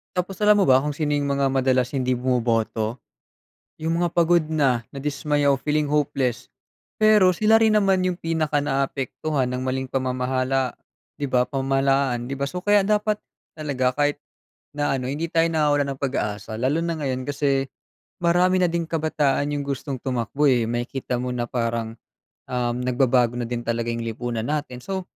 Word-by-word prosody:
Tapos 180 +1 -2
alam 210 0 +6
mo 190 - +4
ba 130 +1 +5
kung 150 - -1
sino 150 0 -1
yung 140 -1 0
mga 140 0 +1
madalas 130 0 +1
hindi 130 -1 0
bumoboto? 120 -2 0 0.8
Yung 165 +1 0
mga 175 -1 0
pagod 170 -1 +3
na, 130 -6 +2
nadismaya 145 +1 0
o 135 - +3
feeling 150 +1 0
hopeless. 135 -4 0 0.6
Pero 210 -4 +6
sila 215 +4 +4
rin 220 -1 +3
naman 195 -3 +3
yung 180 -1 -2
pinaka 155 -3 0
naaapektuhan 135 0 -1
ng 125 0 -3
maling 130 0 -2
pamamahala 130 0 -1 0.4
'di 145 - -2
ba? 125 -2 +1
Pamahalaan 135 -2 +1
'di 135 - -4
ba? 140 - -1
So, 180 +5 -5
kaya 205 0 +3
dapat 210 0 +1 0.4
talaga 130 -4 -1
kahit 145 0 +1 0.5
na 145 -2 0
ano 125 - -4
hindi 150 +5 -3
tayo 165 0 +3
nawawalan 145 -3 +2
ng 135 - -16
pag-asa. 110 -5 -3
Lalo 140 +7 +1
na 170 -1 -2
ngayon 130 -2 -3
kasi 135 -2 0 0.5
marami 180 +2 +3
na 180 - +3
ding 170 0 -1
kabataan 150 -3 0
yung 140 - -3
gustong 140 0 -4
tumakbo, 125 +3 -2
eh, 120 -5 +3
makikita 120 +1 -3
mo 125 0 -3
na 120 -1 -3
parang, 115 -1 -2 0.5
um, 120 -1 -1
nagbabago 125 -1 +2
na 120 - -2
din 120 -1 -3
talaga 115 0 -2
yung 115 0 -4
lipunan 115 0 -3
natin. 145 -4 -3
So 190 +4 -4
135 Hz, 170 wpm, -23 LUFS, 125-155 Hz, 0.8 s, alam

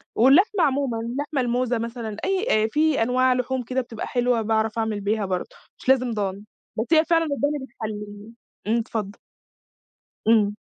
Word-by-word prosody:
واللحمة 340 - +5
عمومًا، 275 -5 +1
اللحمة 270 +5 -2
الموزة 245 0 0
مثلًا، 230 -2 -5
أي 380 - +1
آآ - - +2
في 305 -4 +2
أنواع 255 +2 +3
لحوم 250 +1 -1
كده 255 +2 -1
بتبقى 235 -3 -7
حلوة 245 -1 +1
باعرف 220 0 0
أعمل 220 -2 -1
بيها 210 +1 0
برضه، 185 -1 -4 0.2
مش - - -5
لازم 255 -2 +3
ضاني. 200 -2 -3 0.3
بس 220 - 0
هي 315 0 +5
فعلًا 330 0 +3
الضاني 290 0 -1
بتحلّيه 210 -2 -7 0.4
.إمم، 225 +2 +2
اتفضّل. 220 -3 -4 1.1
إمم. 210 -2 +4
235 Hz, 155 wpm, -24 LUFS, 220-265 Hz, 1.1 s, واللحمة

